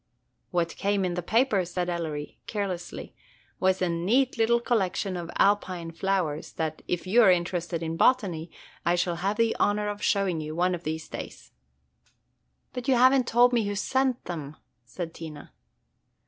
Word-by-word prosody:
"What 170 Hz, -2 st, -1 dB
came 200 Hz, -1 st, +1 dB
in 180 Hz, -, -1 dB
the 180 Hz, -, -2 dB
paper," 220 Hz, +1 st, +2 dB
said 175 Hz, 0 st, -3 dB
Ellery, 160 Hz, -4 st, -4 dB
carelessly, 195 Hz, -5 st, -4 dB, 0.5 s
"was, 185 Hz, 0 st, +2 dB
a -, -, +2 dB
neat 205 Hz, +11 st, +1 dB
little 235 Hz, +1 st, +3 dB
collection 195 Hz, -5 st, 0 dB
of 170 Hz, -1 st, -5 dB
Alpine 185 Hz, -4 st, +1 dB
flowers, 165 Hz, -4 st, -1 dB
that, 160 Hz, -1 st, -3 dB
if 175 Hz, 0 st, -2 dB
you 220 Hz, +6 st, +5 dB
are 215 Hz, -, +7 dB
interested 175 Hz, -1 st, 0 dB
in 165 Hz, 0 st, -3 dB
botany, 175 Hz, -9 st, +2 dB, 0.3 s
I 175 Hz, -, +2 dB
shall 175 Hz, -1 st, 0 dB
have 195 Hz, +4 st, -1 dB
the 230 Hz, -1 st, +2 dB
honor 210 Hz, 0 st, +1 dB
of 205 Hz, 0 st, -5 dB
showing 195 Hz, -5 st, +1 dB
you 155 Hz, 0 st, -5 dB
one 180 Hz, +2 st, +2 dB
of 175 Hz, 0 st, -5 dB
these 160 Hz, +1 st, -3 dB
days." -, -, -8 dB, 1.2 s
"But 250 Hz, +1 st, -5 dB
you 265 Hz, -, +4 dB
have 255 Hz, +2 st, +6 dB
n't 260 Hz, -3 st, +2 dB
told 245 Hz, +1 st, +5 dB
me 230 Hz, -3 st, +2 dB
who 205 Hz, -, -2 dB
sent 260 Hz, +4 st, 0 dB
them," 155 Hz, -4 st, -6 dB, 0.3 s
said 165 Hz, +7 st, -6 dB
Tina. 155 Hz, -3 st, -9 dB
185 Hz, 170 wpm, -27 LUFS, 170-210 Hz, 1.2 s, are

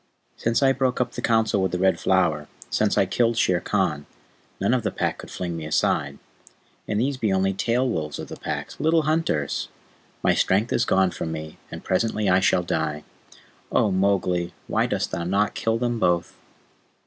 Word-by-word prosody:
"Since 115 Hz, +4 st, 0 dB
I 135 Hz, -, +5 dB
broke 130 Hz, -1 st, 0 dB
up 125 Hz, -1 st, 0 dB
the 120 Hz, -, -6 dB
Council 110 Hz, -4 st, +2 dB
with 95 Hz, -2 st, 0 dB
the 90 Hz, -, -1 dB
Red 95 Hz, +1 st, +2 dB
Flower 75 Hz, -1 st, +1 dB, 0.2 s
since -, -, +1 dB
I -, -, +4 dB
killed 115 Hz, -1 st, +1 dB
Shere 90 Hz, -5 st, +3 dB
Khan 85 Hz, -8 st, -1 dB, 0.5 s
none 100 Hz, +5 st, +2 dB
of 130 Hz, -, +2 dB
the 105 Hz, -, -1 dB
Pack -, -, -2 dB
could -, -, -9 dB
fling 85 Hz, -2 st, -4 dB
me 80 Hz, -, -5 dB
aside. 70 Hz, -2 st, 0 dB, 0.7 s
And 105 Hz, -, 0 dB
these 135 Hz, +3 st, 0 dB
be 110 Hz, -5 st, 0 dB
only 95 Hz, 0 st, +2 dB
tail 120 Hz, +6 st, +1 dB
wolves 75 Hz, -10 st, -3 dB
in -, -, -6 dB
the -, -, -8 dB
Pack, -, -, -5 dB
little 160 Hz, +1 st, +3 dB
hunters! 155 Hz, -, 0 dB, 0.6 s
My -, -, +4 dB
strength 105 Hz, +5 st, +1 dB
is 115 Hz, -, +2 dB
gone 95 Hz, -3 st, +3 dB
from 80 Hz, -, -4 dB
me, 80 Hz, -1 st, -7 dB
and -, -, -8 dB
presently 105 Hz, +2 st, 0 dB
I 90 Hz, 0 st, +5 dB
shall 90 Hz, -1 st, +2 dB
die. 80 Hz, -3 st, -2 dB, 0.7 s
Oh, 105 Hz, -, +3 dB
Mowgli, 90 Hz, -3 st, +1 dB
why -, -, +1 dB
dost -, -, -2 dB
thou 85 Hz, -, -2 dB
not 100 Hz, +4 st, +1 dB
kill 115 Hz, 0 st, 0 dB
them 120 Hz, -1 st, -1 dB
both?" 90 Hz, -4 st, +1 dB
95 Hz, 190 wpm, -24 LUFS, 85-115 Hz, 0.7 s, I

